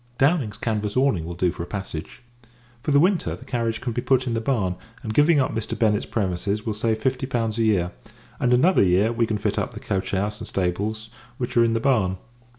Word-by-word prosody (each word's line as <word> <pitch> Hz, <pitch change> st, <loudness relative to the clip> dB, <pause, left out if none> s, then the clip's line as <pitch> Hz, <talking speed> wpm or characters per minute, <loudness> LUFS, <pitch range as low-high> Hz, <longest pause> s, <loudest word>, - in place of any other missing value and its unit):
Downing's 135 Hz, -7 st, +2 dB
canvas 105 Hz, -1 st, -2 dB
awning 130 Hz, -12 st, +2 dB
will 85 Hz, +1 st, -6 dB
do 90 Hz, 0 st, +1 dB
for 85 Hz, -, -7 dB
a 85 Hz, -, -5 dB
passage. 95 Hz, +2 st, -6 dB, 0.6 s
For 150 Hz, -, -4 dB
the 140 Hz, -1 st, +5 dB
winter, 180 Hz, +3 st, +2 dB
the -, -, -14 dB
carriage 115 Hz, -2 st, -2 dB
can 120 Hz, -, -3 dB
be 120 Hz, -, -1 dB
put 130 Hz, 0 st, +2 dB
in 120 Hz, -, -1 dB
the 115 Hz, -, -1 dB
barn; 105 Hz, -8 st, 0 dB, 0.3 s
and, 110 Hz, -2 st, -3 dB
giving 150 Hz, +4 st, +5 dB
up 130 Hz, -, +1 dB
Mr. 110 Hz, -1 st, -3 dB
Bennett's 105 Hz, -3 st, +2 dB
premises, 100 Hz, +1 st, -1 dB
will 110 Hz, -, -1 dB
save 110 Hz, +1 st, 0 dB
fifty 130 Hz, +3 st, -1 dB
pounds 115 Hz, -4 st, -1 dB
a -, -, +3 dB
year: 90 Hz, -5 st, +2 dB, 0.5 s
and, 125 Hz, -, +2 dB
another 165 Hz, +10 st, +5 dB
year, 95 Hz, +4 st, +3 dB
we 115 Hz, -1 st, +1 dB
can 110 Hz, -, -1 dB
fit -, -, -1 dB
up -, -, -3 dB
the -, -, -6 dB
coach 95 Hz, -1 st, -2 dB
house 105 Hz, +2 st, -1 dB
and -, -, -6 dB
stables, 105 Hz, +5 st, -2 dB, 0.3 s
which 125 Hz, 0 st, -4 dB
are 120 Hz, -, +6 dB
in 115 Hz, -1 st, +2 dB
the 115 Hz, -, +1 dB
barn. 110 Hz, -8 st, +2 dB
110 Hz, 230 wpm, -24 LUFS, 100-125 Hz, 0.6 s, are